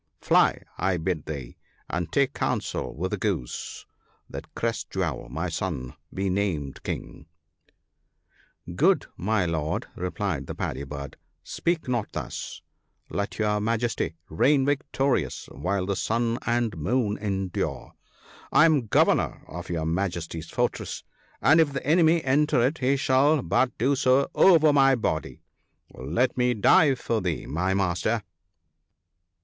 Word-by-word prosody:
Fly! - - +3 0.2
I 95 0 +1
bid 80 -2 -2
thee, 70 -6 -6 0.3
and 85 0 -3
take 140 0 +2
counsel - - -2
with - - -3
the - - -1
Goose - - -3 0.4
that - - -9
Crest - - -2
jewel, - - -2
my 80 +8 -3
son, 80 -7 -4 0.2
be 95 +1 -2
named 90 -8 -2
King! 80 - -6 0.4
" - - -50 0.2
" - - -14
Good - - +3
my 100 0 0
Lord," 80 -2 -2
replied 90 0 -3
the - - -5
Paddy 70 +2 -3
bird, 70 0 -7 0.2
" - - -49
speak 170 -4 -2
not 120 -4 -1
thus! - - -6 0.5
Let 100 0 -3
your 105 -1 +1
Majesty 115 -5 -1
reign 135 - +3
victorious 140 -1 0
while 90 +6 -2
the 100 +1 -1
sun 115 +4 0
and 120 -3 +1
moon 105 - 0
endure. 95 -3 -3 0.6
I 155 - +6
am 150 -8 +3
governor - - +2
of 85 +2 -8
your 80 -2 -2
Majesty's 85 -2 -3
for - - +2
tress, - - -7 0.4
and 160 +3 +6
if 145 -3 +1
the 135 - -4
enemy 165 +2 +4
enter 145 +1 +2
it 150 +5 -1
he 135 +2 +2
shall 135 +1 +3
but 130 -1 +1
do 135 +5 +2
so 130 +1 +3
over 160 -5 +6
my 135 -1 +5
body; 80 -9 -3 0.5
let 85 - 0
me 125 -1 +2
die 135 +6 +5
for 115 -3 -2
thee, 90 -4 -2
my 90 +5 -1
Master 95 +4 0
105 Hz, 145 wpm, -26 LUFS, 85-135 Hz, 0.6 s, I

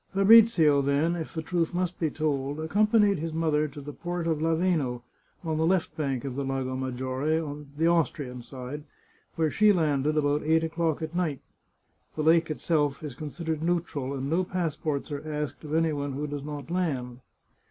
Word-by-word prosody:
Fabrizio, 195 -8 +6
then, 140 +5 +1
if 165 -2 -5
the 160 - -3
truth 170 +1 -1
must 180 0 -1
be 160 - +1
told, 145 -2 -2
accompanied 205 +3 +3
his 165 +1 -4
mother 155 -2 +1
to 145 0 -10
the 145 +1 -8
port 175 +1 -4
of 160 -2 0
Laveno, 160 -7 +1 0.4
on 160 -2 -1
the 160 - +1
left 185 -1 +1
bank 140 -4 -2
of 135 - -3
the 140 - -2
Lago 135 -1 -2
Maggiore, 130 +4 -1 0.4
the 160 - +2
Austrian 145 -7 0
side, 130 +4 -7 0.5
where 160 -2 +1
she 215 0 +5
landed 155 -4 +1
about 145 0 +2
eight 160 +1 +2
o'clock 160 -1 -1
at 160 +1 -5
night. 165 -6 -1 0.7
(The 155 - -1
lake 165 +1 +4
itself 150 -2 0
is 150 -4 -5
consid 155 +5 -7
ered 160 -1 -1
neutral, 160 -5 -1
and 135 0 -3
no 165 +5 +1
passports 160 -5 -2
are 145 - -3
asked 150 -1 -4
of 155 0 -3
any 165 -1 +2
one 145 -1 -3
who 145 +3 -3
does 145 -1 -4
not 150 +1 -7
land.) 135 -9 -2
155 Hz, 185 wpm, -27 LUFS, 140-165 Hz, 0.7 s, Fabrizio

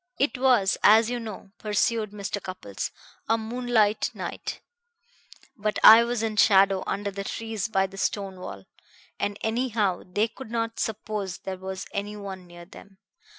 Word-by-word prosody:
"It 280 +2 +1
was, 250 -7 +3
as 220 +2 +6
you 245 - -2
know," 215 -3 -8
pursued 215 +1 0
Mr. 205 0 -5
Cupples, 185 - -5 0.4
"a 225 - +4
moonlight 225 -2 +1
night; - - -5 1.0
but 215 -3 -2
I 225 +2 +10
was 235 -1 -2
in 220 -1 -2
shadow 195 -2 +5
under 200 +1 -2
the 200 0 -5
trees 225 0 -3
by 195 -3 +2
the 195 0 -10
stone 195 -3 -2
wall, 95 - -8 0.5
and 205 0 -1
anyhow 220 -5 0
they 205 +5 0
could 235 +1 -11
not 230 0 -2
suppose 210 -4 -3
there 190 -1 -6
was 190 0 -6
any 205 +1 -3
one 190 -3 -8
near 175 0 -12
them. 195 +1 -15
210 Hz, 155 wpm, -26 LUFS, 195-225 Hz, 1.0 s, I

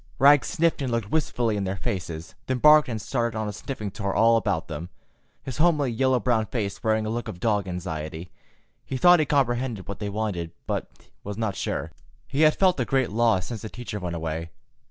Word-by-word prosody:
Rags 140 -3 +6
sniffed 165 -3 +1
and 130 -3 -1
looked 115 -3 -2
wistfully 120 -8 0
in 100 - -1
their 95 +1 -2
faces, 85 -4 -4
then 130 - 0
barked 150 +2 +6
and 115 -2 -3
started 115 +1 -2
on 110 -1 -2
a 105 - -4
sniffing 110 -7 -5
tour 100 -1 -3
all 115 +1 +5
about 80 -7 0
them, 80 +2 -6 0.5
his 130 - -6
homely 150 -6 +3
yellow 130 +2 +2
brown 110 0 +1
face 100 -4 -3
wearing 110 -1 +1
a - - -2
look 120 +1 -3
of 90 - -7
dog 105 -2 +1
anxiety. 80 -2 -5 0.5
He 130 - -4
thought 175 +4 +7
he 155 - +1
comprehended 120 - 0
what 100 - -6
they 105 -1 -3
wanted, 100 -6 -3
but - - -2 0.3
was 100 0 -6
not 110 -3 -1
sure. - - -3 0.4
He 140 +3 -1
had 155 -1 +6
felt 185 -5 +3
a - - +2
great 130 -3 +1
loss 110 -4 +2
since 115 -3 -6
the 110 - -6
teacher 120 -3 -6
went 90 -2 -4
away. 80 0 -4
110 Hz, 210 wpm, -25 LUFS, 95-130 Hz, 0.5 s, thought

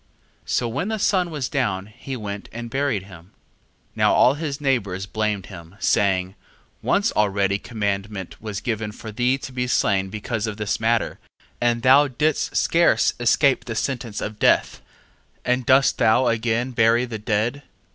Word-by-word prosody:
2:7. - - -13
So 120 - +1
when 135 - -2
the 220 0 -1
sun 185 -3 +1
was 145 -5 -3
down, 105 -10 -1
he 130 +2 -6
went 100 -2 -6
and 120 0 -7
buried 135 -7 0
him. 85 -4 -13
2:8. 95 - -26 0.7
Now - - +4
all 125 - +5
his 145 -2 -4
neighbours 100 -10 -1
blamed 105 -2 -2
him, 85 +2 -12
saying: 95 -3 +1 0.5
once - - +1
already 100 -1 +1
commandment 100 -3 -4
was 105 -2 -5
given 110 -3 -3
for 110 +1 -9
thee 125 +5 +1
to 135 - -8
be 125 -1 -2
slain 95 -5 +1
because 110 +2 -3
of 105 -1 -5
this 105 -1 -2
matter, 115 +1 0 0.4
and 120 -1 +1
thou 135 +3 +6
didst 150 +3 -1
scarce 170 +1 +3
escape 125 +3 +3
the 115 - -5
sentence 120 -3 -3
of 105 0 -5
death, - - +2 0.6
and 125 -1 0
dost 135 +1 +4
thou 120 +1 +4
again 115 +2 0
bury 115 +1 +3
the 115 -3 -6
dead? 110 +6 -1
115 Hz, 165 wpm, -22 LUFS, 105-130 Hz, 0.7 s, thou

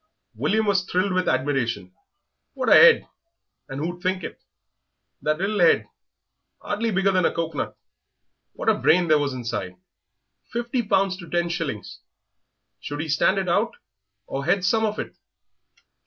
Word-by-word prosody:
William 220 +1 0
thrilled 190 0 0
with 185 -1 +1
admiration. 115 -9 -1 0.6
What - - -1
a - - +7 0.2
'ead, - - 0 0.6
and 135 - -5
who'd 175 +3 -4
think 185 0 -1
it? - - -8 0.8
that 155 0 0
little 200 +2 -1
'ead, 170 - +4 0.7
hardly 220 +3 -2
bigger 195 -1 +2
than 185 -1 +2
a - - +3
cocoanut! 165 -3 -3 0.8
What - - -7
a - - +6
brain 175 0 +3
there 155 -1 +5
was 140 -2 -2
inside! 115 -7 -4 0.8
Fifty 240 +1 -1
pounds 195 -3 +1
to 175 -3 -11
ten 175 0 0
shillings; 160 - -4 0.8
should 145 0 -6
he 160 - -5
stand 160 +6 +2
it 190 -1 -1
out 205 +7 +1 0.5
or 135 - -4
hedge 180 +3 +2
some 220 +3 +2
of 210 - -4
it? - - -6
175 Hz, 150 wpm, -24 LUFS, 145-195 Hz, 0.8 s, a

